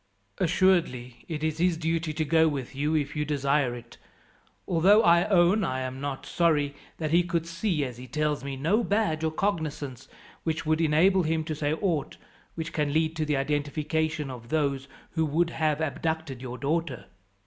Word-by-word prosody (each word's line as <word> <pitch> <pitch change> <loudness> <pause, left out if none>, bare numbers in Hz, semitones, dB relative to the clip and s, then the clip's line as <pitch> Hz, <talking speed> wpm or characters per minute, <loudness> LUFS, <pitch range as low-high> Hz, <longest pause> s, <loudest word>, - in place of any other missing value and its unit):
"Assuredly 165 -9 +1
it 155 -2 -4
is 155 0 -1
his 175 -1 +2
duty 165 0 -1
to 155 +1 -2
go 160 +2 +4
with 140 -5 -3
you 150 +3 0
if 150 -1 -1
you 150 - 0
desire 140 -3 +1
it; 120 -1 -12 0.7
although 190 +6 +5
I 170 +1 +5
own 195 +1 +4
I 130 -6 -1
am 130 +1 -5
not 140 -2 -4
sorry 150 -4 +1 0.2
that 155 -2 -2
he 170 +2 +5
could 170 -2 -1
see, 170 -2 -1
as 125 -2 -7
he 125 +1 -9
tells 150 +1 -1
me, 140 -1 -4
no 175 - +1
badge 200 -7 0
or 160 - +2
cognizance 155 - -3 0.4
which 160 -1 -2
would 155 +1 +1
enable 170 +5 +4
him 160 -1 0
to 155 - -4
say 150 0 -1
aught 160 -4 -1 0.4
which 165 0 -5
can 150 -3 0
lead 160 +1 +1
to 155 - 0
the 150 -2 0
identification 150 +1 -1
of 120 -2 -10
those 140 -3 0 0.2
who 160 - 0
would 165 +3 +1
have 155 -2 0
abducted 160 -2 -2
your 125 -1 -6
daughter. 150 -2 -2
155 Hz, 180 wpm, -27 LUFS, 140-165 Hz, 0.7 s, although